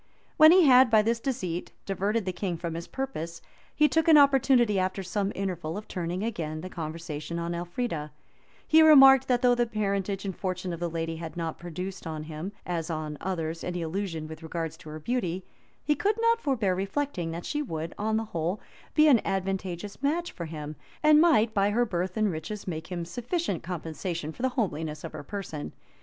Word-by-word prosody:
When 310 Hz, +1 st, +9 dB
he 365 Hz, +1 st, +7 dB
had, 255 Hz, -2 st, +7 dB
by 220 Hz, -2 st, +5 dB
this 230 Hz, +1 st, +1 dB
deceit, 190 Hz, -10 st, -3 dB
diverted 200 Hz, +3 st, -1 dB
the 185 Hz, -, -1 dB
king 180 Hz, -2 st, -3 dB
from 170 Hz, 0 st, -4 dB
his 170 Hz, +1 st, -6 dB
purpose 170 Hz, -12 st, -5 dB, 0.4 s
he 300 Hz, -, +5 dB
took 320 Hz, +2 st, +1 dB
an 320 Hz, -2 st, +8 dB
opportunity, 265 Hz, -7 st, +5 dB
after 185 Hz, +1 st, -1 dB
some 195 Hz, +2 st, -1 dB
interval, 175 Hz, -4 st, -3 dB
of 210 Hz, -, -7 dB
turning 180 Hz, +1 st, -3 dB
again 160 Hz, -9 st, -3 dB
the 185 Hz, +2 st, -7 dB
conversation 160 Hz, -1 st, -5 dB
on 170 Hz, 0 st, -2 dB
Elfrida; 175 Hz, -2 st, -3 dB, 0.6 s
he 320 Hz, +1 st, +6 dB
remarked, 270 Hz, -4 st, +8 dB
that 245 Hz, -1 st, +1 dB
though 245 Hz, -1 st, +6 dB
the 240 Hz, 0 st, +1 dB
parentage 200 Hz, -2 st, -2 dB
and 190 Hz, -2 st, -3 dB
fortune 185 Hz, -1 st, -3 dB
of 170 Hz, -, -6 dB
the 175 Hz, 0 st, -2 dB
lady 165 Hz, 0 st, -3 dB
had 165 Hz, +1 st, -7 dB
not 165 Hz, -2 st, -3 dB
produced 180 Hz, +2 st, -6 dB
on 155 Hz, -1 st, -4 dB
him, 155 Hz, +4 st, -6 dB
as 170 Hz, -2 st, -3 dB
on 155 Hz, -2 st, -3 dB
others, 165 Hz, -3 st, -3 dB
any 180 Hz, -1 st, -3 dB
illusion 165 Hz, -2 st, -3 dB
with 160 Hz, +1 st, -9 dB
regard 165 Hz, 0 st, -3 dB
to 155 Hz, -, -13 dB
her 155 Hz, +1 st, -7 dB
beauty, 185 Hz, -2 st, -2 dB, 0.4 s
he 300 Hz, -, +3 dB
could 405 Hz, +8 st, +1 dB
not 460 Hz, 0 st, +3 dB
forbear 225 Hz, -9 st, +1 dB
reflecting, 195 Hz, -, -2 dB
that 170 Hz, +1 st, -5 dB
she 295 Hz, -, -1 dB
would, 165 Hz, -, -4 dB
on 220 Hz, +1 st, +1 dB
the 225 Hz, -, -2 dB
whole, 175 Hz, 0 st, -2 dB, 0.4 s
be 310 Hz, 0 st, +6 dB
an 255 Hz, -7 st, +6 dB
advantageous 195 Hz, +1 st, -3 dB
match 330 Hz, +5 st, 0 dB
for 170 Hz, -, -6 dB
him, 155 Hz, -1 st, -6 dB, 0.3 s
and 305 Hz, 0 st, +7 dB
might, 235 Hz, -10 st, +4 dB
by 200 Hz, -1 st, +3 dB
her 240 Hz, +4 st, +2 dB
birth 185 Hz, -1 st, -3 dB
and 215 Hz, -2 st, +2 dB
riches, 175 Hz, +7 st, -6 dB
make 160 Hz, -2 st, -4 dB
him 175 Hz, -2 st, -4 dB
sufficient 240 Hz, -, -2 dB
compensation 165 Hz, -1 st, -4 dB
for 160 Hz, -, -11 dB
the 260 Hz, -, +2 dB
homeliness 160 Hz, -, -2 dB
of -, -, -6 dB
her -, -, -7 dB
person. 160 Hz, -2 st, -6 dB
185 Hz, 200 wpm, -28 LUFS, 165-235 Hz, 0.6 s, When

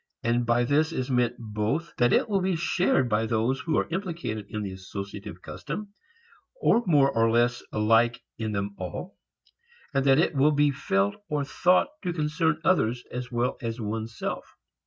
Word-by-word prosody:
And 120 Hz, 0 st, +1 dB
by 120 Hz, +1 st, +3 dB
this 150 Hz, +5 st, +2 dB
is 130 Hz, -4 st, -3 dB
meant 125 Hz, -1 st, +2 dB
both 110 Hz, +9 st, -2 dB
that 120 Hz, 0 st, +3 dB
it -, -, +3 dB
will 200 Hz, -3 st, +1 dB
be 185 Hz, -1 st, +1 dB
shared 170 Hz, -5 st, +2 dB
by 110 Hz, 0 st, +1 dB
those 120 Hz, +4 st, 0 dB
who 165 Hz, -, -1 dB
are -, -, +1 dB
implicated 165 Hz, -, -3 dB
in 105 Hz, -1 st, -4 dB
the 100 Hz, -, -4 dB
associative 100 Hz, +1 st, -8 dB
custom, 205 Hz, -1 st, -6 dB, 0.7 s
or 235 Hz, -, +4 dB
more 140 Hz, -5 st, +5 dB
or 115 Hz, -2 st, +3 dB
less 120 Hz, +1 st, +2 dB
alike 115 Hz, +3 st, +3 dB, 0.2 s
in 110 Hz, -1 st, -2 dB
them 100 Hz, 0 st, -2 dB
all, 95 Hz, -, -6 dB, 0.8 s
and 135 Hz, -1 st, +2 dB
that 135 Hz, 0 st, +6 dB
it 160 Hz, -, +2 dB
will 145 Hz, +2 st, +4 dB
be 145 Hz, 0 st, +3 dB
felt 100 Hz, -8 st, 0 dB
or 150 Hz, -2 st, 0 dB
thought 180 Hz, -, +3 dB
to 180 Hz, -3 st, -2 dB
concern 160 Hz, 0 st, 0 dB
others 125 Hz, -11 st, +2 dB
as 125 Hz, 0 st, -5 dB
well 120 Hz, +1 st, 0 dB
as 115 Hz, 0 st, -4 dB
one's 110 Hz, +1 st, -4 dB
self. -, -, -5 dB
125 Hz, 180 wpm, -27 LUFS, 110-155 Hz, 0.8 s, that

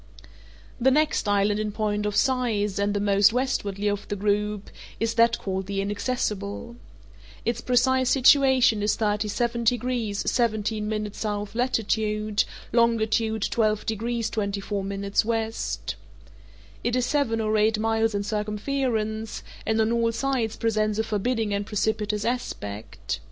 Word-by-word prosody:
The 255 Hz, +2 st, +4 dB
next 300 Hz, -4 st, +2 dB
island 205 Hz, +1 st, +2 dB
in 215 Hz, 0 st, -2 dB
point 210 Hz, 0 st, -1 dB
of 205 Hz, -, -2 dB
size, 215 Hz, -5 st, +1 dB
and 205 Hz, 0 st, +1 dB
the -, -, +1 dB
most 200 Hz, 0 st, +4 dB
westwardly 210 Hz, -5 st, -1 dB
of 205 Hz, 0 st, -2 dB
the 205 Hz, -, -2 dB
group, 210 Hz, 0 st, -1 dB, 0.3 s
is 225 Hz, 0 st, 0 dB
that 230 Hz, 0 st, +4 dB
called 190 Hz, -1 st, -3 dB
the 200 Hz, 0 st, -2 dB
Inaccessible. 205 Hz, +1 st, -2 dB, 0.7 s
Its 235 Hz, 0 st, -1 dB
precise 255 Hz, +1 st, +2 dB
situation 265 Hz, -4 st, +5 dB
is 210 Hz, -, +2 dB
37 220 Hz, +3 st, 0 dB
degrees 235 Hz, -3 st, 0 dB
17' 215 Hz, -2 st, 0 dB
S. 210 Hz, +1 st, -6 dB, 0.3 s
latitude, 215 Hz, -3 st, 0 dB, 0.3 s
longitude 225 Hz, -2 st, +2 dB
12 215 Hz, -2 st, +1 dB
degrees 230 Hz, +1 st, -2 dB
24' 200 Hz, -1 st, -2 dB
W. 200 Hz, 0 st, -4 dB, 1.8 s
It 240 Hz, +1 st, 0 dB
is 250 Hz, -1 st, +1 dB
seven 245 Hz, -5 st, +1 dB
or 215 Hz, -1 st, 0 dB
eight 215 Hz, +1 st, +3 dB
miles 225 Hz, 0 st, +1 dB
in 200 Hz, -, 0 dB
circumference, 220 Hz, +1 st, -2 dB, 0.2 s
and 220 Hz, 0 st, +2 dB
on 220 Hz, +1 st, +2 dB
all 230 Hz, -1 st, +2 dB
sides 235 Hz, -2 st, -1 dB
presents 215 Hz, -2 st, 0 dB
a 220 Hz, -, +1 dB
forbidding 220 Hz, 0 st, -1 dB
and 200 Hz, 0 st, 0 dB
precipitous 210 Hz, 0 st, -1 dB
aspect. 110 Hz, -, -4 dB
220 Hz, 130 wpm, -25 LUFS, 205-235 Hz, 1.8 s, situation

